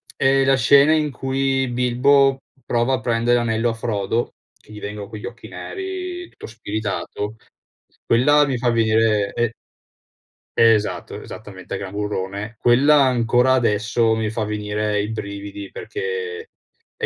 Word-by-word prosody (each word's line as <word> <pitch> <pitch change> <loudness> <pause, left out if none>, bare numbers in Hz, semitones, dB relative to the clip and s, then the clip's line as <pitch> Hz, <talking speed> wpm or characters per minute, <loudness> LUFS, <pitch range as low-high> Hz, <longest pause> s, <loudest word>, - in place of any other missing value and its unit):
è 135 0 +3
la 135 0 +4
scena 140 +5 +5
in 150 -2 +1
cui 135 0 -1
Bilbo 130 +3 +3 0.2
prova 120 +2 +1
a 120 - 0
prendere 120 +1 +1
l'anello 115 0 0
a - - -4
Frodo 115 0 -2 0.2
che - - -20
gli 105 - -9
vengono 105 0 -6
quegli 110 -2 -8
occhi 120 0 -9
neri, 365 -2 -6
tutto - - -11
spiritato. 105 -1 -4 0.7
Quella 145 +5 +4
mi 135 -2 -1
fa 120 0 +1
venire 110 -3 +2
e 120 -1 0 1.0
esatto, 115 -2 +2
esattamente, 95 -4 -8
Gran 95 -1 -6
Burrone. 105 +1 -4
Quella 140 +5 +5
ancora 125 +1 +3
adesso 115 -1 +2
mi 110 -1 -1
fa 110 0 -2
venire 105 0 -1
i 105 - -3
brividi, 100 -2 -6
perché, 455 +1 -5 0.5
è - - -2
115 Hz, 135 wpm, -21 LUFS, 105-135 Hz, 1.0 s, scena